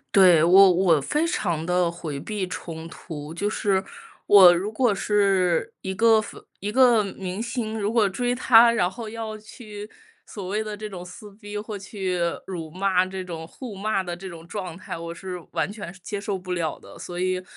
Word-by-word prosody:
对， 180 -5 +7
我 190 +2 +7
我 175 -4 +3
非 300 - 0
常 170 - -1
地 180 0 +2
回 160 -4 -6
避 210 +3 -3
冲 165 -2 -7
突， 155 -3 -8
就 205 +5 -1
是 195 -3 +1 0.4
我 190 -4 +9
如 185 +4 -2
果 220 0 +2
是 195 -4 +1
一 190 0 -4
个 225 +1 +5
粉 215 - -11 0.2
一 205 - -3
个 245 -1 +5
明 195 0 -5
星， 225 -2 -3
如 210 +2 -1
果 215 -4 +3
追 245 +5 -1
他， 235 -1 +6
然 185 -5 +1
后 230 0 -7
要 220 -1 -6
去 210 -1 -10 0.4
所 190 -3 -7
谓 210 +2 0
的 215 -1 -5
这 210 +1 -7
种 185 -3 -8
撕 205 +3 -11
逼， 205 -1 -7
或 210 0 -5
去 190 -2 -3 0.3
辱 170 -4 -6
骂 185 +2 +1
这 185 0 -6
种 165 -2 -7
互 240 +3 -9
骂 195 0 -1
的 175 -1 -5
这 185 +2 -8
种 165 -2 -10
状 180 -2 -6
态， 185 - -7
我 170 0 -7
是 180 0 -6
完 - - -1
全 205 -5 -7
受 190 - -17
接 205 -2 -4
受 200 -1 -3
不 185 0 -8
了 170 -3 -2
的。 - - -14
所 175 0 -7
以， 185 0 0
195 Hz, 215 characters per minute, -24 LUFS, 180-215 Hz, 0.4 s, 我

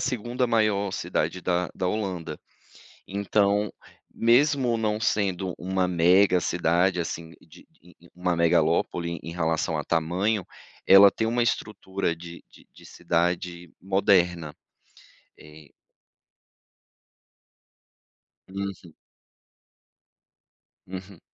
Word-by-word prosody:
2ª 125 0 -1
maior 105 -4 +1
cidade 90 - -2
da 90 0 -1
da 90 - -2
Holanda, 95 -4 -3 0.7
então, 100 +1 0 0.4
mesmo 125 +1 +3
não 110 -1 -1
sendo 95 -4 -1
uma 95 0 -1
mega 90 +2 +4
cidade, 90 +2 +1
assim, 85 0 -5
de 80 - -18
de 90 +1 -22 0.2
uma 90 -1 -1
megalópole 85 +1 +1
em 85 +2 -7
relação 80 -1 -1
a 75 - -3
tamanho, 90 +5 0 0.4
ela 100 +1 +9
tem 110 - -2
uma 120 +2 +1
estrutura 100 -6 -2
de 85 +1 -11
de - - -20
de - - -18
cidade 85 0 -2
moderna, 90 -5 +1 0.8
eh 75 0 -15 2.8
Uhum. 95 -4 -6 1.9
Uhum. 95 0 -9
90 Hz, 95 wpm, -25 LUFS, 85-100 Hz, 2.8 s, ela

